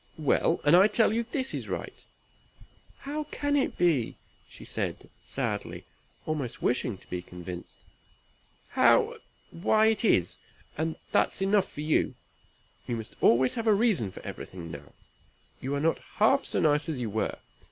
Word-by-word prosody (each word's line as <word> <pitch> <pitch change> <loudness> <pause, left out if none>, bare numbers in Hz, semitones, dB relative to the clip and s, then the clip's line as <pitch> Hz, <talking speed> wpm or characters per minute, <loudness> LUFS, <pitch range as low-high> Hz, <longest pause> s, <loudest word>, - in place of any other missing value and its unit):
"Well! 160 +2 +2
and 145 +3 +6
I 190 +3 +7
tell 215 0 +3
you 230 - +1
this 260 +3 -2
is - - -4
right." - - -4 1.1
"How 295 +2 -4
can 290 0 -1
it 280 - 0
be?" 160 -10 +2 0.3
said - - -4
she, - - -18
sadly, - - -3 0.4
almost 145 -6 -3
wishing 120 -3 0
to - - -20
be 90 - -2
convinced. 90 0 -9 0.9
"How - - +4 0.3
why 215 +5 +3
it 220 - 0
is, 90 - +2 0.4
and 160 +1 -2 0.2
that's - - +2
enough 195 0 +2
for 150 - -6
you. 155 +1 +1 0.7
You 120 - -1
must 110 -1 -7
always 125 +2 +4
have 230 -1 -3
a 215 - +6
reason 205 - +2
for - - -11
everything 85 -3 -8
now. 70 -2 -10 0.7
You 135 +2 -2
are - - -1
not 160 +3 +1
half 230 +6 +2
so - - +1
nice 150 0 +2
as 155 - -2
you 120 -4 -3
were. 110 +1 -1
155 Hz, 160 wpm, -28 LUFS, -, 1.1 s, I